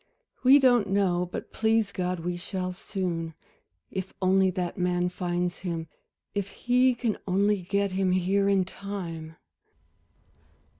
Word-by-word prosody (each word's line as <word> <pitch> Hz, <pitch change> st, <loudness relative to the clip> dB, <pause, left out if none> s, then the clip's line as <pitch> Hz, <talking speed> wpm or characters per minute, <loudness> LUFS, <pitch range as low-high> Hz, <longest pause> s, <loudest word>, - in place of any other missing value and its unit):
"We 265 Hz, +2 st, +8 dB
don't 245 Hz, -7 st, +4 dB
know, 180 Hz, -3 st, +1 dB
but -, -, -6 dB
please 220 Hz, -2 st, +2 dB
God, 180 Hz, -2 st, -2 dB
we 175 Hz, +1 st, -2 dB
shall 185 Hz, +1 st, -4 dB
soon. 175 Hz, -4 st, -3 dB, 0.6 s
If 190 Hz, 0 st, -5 dB
only 190 Hz, 0 st, +4 dB
that 180 Hz, -1 st, -3 dB
man 180 Hz, -1 st, +1 dB
finds 175 Hz, 0 st, -2 dB
him, 165 Hz, -3 st, -4 dB, 0.4 s
if 200 Hz, -1 st, -2 dB
he 250 Hz, +1 st, +2 dB
can 235 Hz, -3 st, -1 dB
only 200 Hz, +2 st, +2 dB
get 200 Hz, +2 st, 0 dB
him 190 Hz, 0 st, +1 dB
here 190 Hz, +2 st, +2 dB
in 195 Hz, -2 st, +3 dB
time." 170 Hz, -5 st, -6 dB
185 Hz, 135 wpm, -27 LUFS, 180-200 Hz, 0.6 s, We